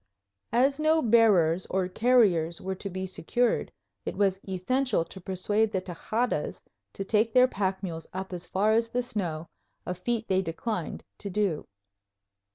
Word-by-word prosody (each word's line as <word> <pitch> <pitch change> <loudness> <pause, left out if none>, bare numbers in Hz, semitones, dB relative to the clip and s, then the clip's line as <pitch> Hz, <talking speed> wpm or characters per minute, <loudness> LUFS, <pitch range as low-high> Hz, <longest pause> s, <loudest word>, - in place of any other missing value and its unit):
As 270 +5 +3
no 310 +1 +4
bearers 200 -7 +4
or 190 -1 0
carriers 185 -7 +3
were 190 - -3
to 195 +1 -6
be 185 0 -4
secured, 225 +6 0 0.3
it - - -5
was 195 -2 +2
essential 205 +2 0
to 190 - -10
persuade 205 +4 0
the 190 - 0
Tejadas 205 +7 -2 0.3
to 195 - -4
take 220 +3 +1
their 255 0 +7
pack 190 -4 -2
mules 165 -3 -5
up 190 0 -5
as 175 0 -5
far 205 +3 +2
as 230 +1 +2
the 245 +1 -1
snow, 170 -9 -3 0.4
a 180 - -2
feat 225 +5 -2
they 190 0 +2
declined 180 +1 -4 0.2
to 200 - -5
do. 190 -5 -1
195 Hz, 160 wpm, -28 LUFS, 180-230 Hz, 0.4 s, their